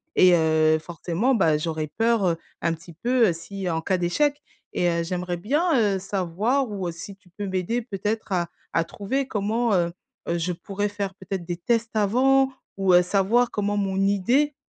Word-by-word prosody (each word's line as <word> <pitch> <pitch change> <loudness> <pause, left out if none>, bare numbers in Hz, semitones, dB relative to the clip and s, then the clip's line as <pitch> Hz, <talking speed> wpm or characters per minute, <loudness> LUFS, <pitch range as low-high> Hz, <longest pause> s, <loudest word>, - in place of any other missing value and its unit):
et 185 -1 +6
heu, 155 -1 +3
forcément, 175 +9 -1
bah, 160 -7 +3
j'aurais 155 -1 -2
peur, 230 -2 +2
heu, 165 - +1 0.3
un 170 -1 +2
petit 170 +1 -11
peu, 235 +3 +2
si 185 +3 -5
en 160 -1 -1
cas 185 +2 0
d'échec 290 +12 +1 0.3
et 175 - +2
heu, 170 0 0
j'aimerais 180 0 -3
bien, 275 - 0 0.3
heu, - - -2
savoir 200 +8 0
ou 190 -3 -3
si 185 +4 -9
tu 195 -2 -26
peux 205 - -3
m'aider 190 +6 -1
peut-être 210 -1 -3
à 175 -2 +1 0.3
à 165 - +2
trouver 255 +10 -3
comment, 220 +3 0
heu, 170 -1 +1 0.4
heu, 170 - +1
je 175 +2 -1
pourrais 195 +4 -3
faire 200 -1 -4
peut-être 190 -2 -5
des 175 0 -4
tests 230 +4 -1
avant? 265 +6 +3 0.3
Ou 190 -2 +3
heu, 180 - +7
savoir 205 +6 +2
comment 205 0 -1
mon 195 -1 -1
idée, 250 +9 +2
195 Hz, 185 wpm, -24 LUFS, 175-225 Hz, 0.4 s, heu